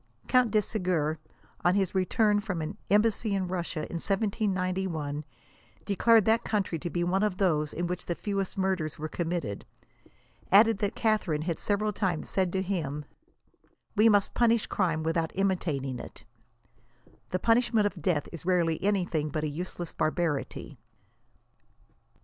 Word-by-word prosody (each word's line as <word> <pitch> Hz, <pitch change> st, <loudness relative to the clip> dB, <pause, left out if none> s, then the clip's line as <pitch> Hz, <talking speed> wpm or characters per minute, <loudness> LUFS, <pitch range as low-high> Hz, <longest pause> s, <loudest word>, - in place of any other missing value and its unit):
Count 250 Hz, -2 st, +4 dB
de 215 Hz, 0 st, +3 dB
Segur, 180 Hz, -7 st, -1 dB, 0.4 s
on 175 Hz, +1 st, +4 dB
his 195 Hz, -3 st, +1 dB
return 205 Hz, +3 st, +2 dB
from 200 Hz, -5 st, -3 dB
an 160 Hz, +6 st, -5 dB
em 210 Hz, +1 st, +5 dB
bassy 220 Hz, -2 st, 0 dB
in 190 Hz, -2 st, -1 dB
Russia 175 Hz, -3 st, -3 dB
in 170 Hz, -, -4 dB
1791, 185 Hz, -6 st, -1 dB, 0.6 s
declared 220 Hz, +1 st, +4 dB
that 225 Hz, +1 st, +3 dB
country 195 Hz, -6 st, -1 dB
to 175 Hz, -, -4 dB
be 175 Hz, 0 st, -1 dB
one 185 Hz, +3 st, +1 dB
of 210 Hz, -3 st, 0 dB
those 155 Hz, -6 st, +1 dB
in 175 Hz, -, -2 dB
which 180 Hz, +1 st, -4 dB
the 175 Hz, -, -1 dB
fewest 195 Hz, -1 st, -3 dB
murders 190 Hz, -5 st, -1 dB
were 155 Hz, -, -4 dB
committed, 165 Hz, -, -3 dB, 0.9 s
adding 220 Hz, +2 st, +6 dB
that 205 Hz, +1 st, -1 dB
Catharine 200 Hz, -9 st, +1 dB
had 170 Hz, -1 st, -2 dB
several 210 Hz, +1 st, 0 dB
times 185 Hz, -6 st, -1 dB
said 185 Hz, -2 st, 0 dB
to 190 Hz, 0 st, 0 dB
him, 150 Hz, -6 st, -3 dB, 0.4 s
'< -, -, -39 dB
we 220 Hz, +2 st, +6 dB
must 205 Hz, -2 st, +3 dB
punish 235 Hz, -2 st, +3 dB
crime 165 Hz, -5 st, 0 dB
without 165 Hz, 0 st, -1 dB
imitating 155 Hz, -10 st, -1 dB
it; -, -, -10 dB, 1.0 s
the 185 Hz, -, 0 dB
punishment 230 Hz, 0 st, +3 dB
of 200 Hz, -4 st, -2 dB
death 150 Hz, -3 st, 0 dB
is 170 Hz, -, -8 dB
rarely 170 Hz, -2 st, +1 dB
anything 175 Hz, -7 st, 0 dB
but 155 Hz, +1 st, -3 dB
a -, -, 0 dB
useless 175 Hz, +2 st, -5 dB
barbarity." 155 Hz, -2 st, -2 dB
185 Hz, 155 wpm, -28 LUFS, 165-205 Hz, 1.0 s, adding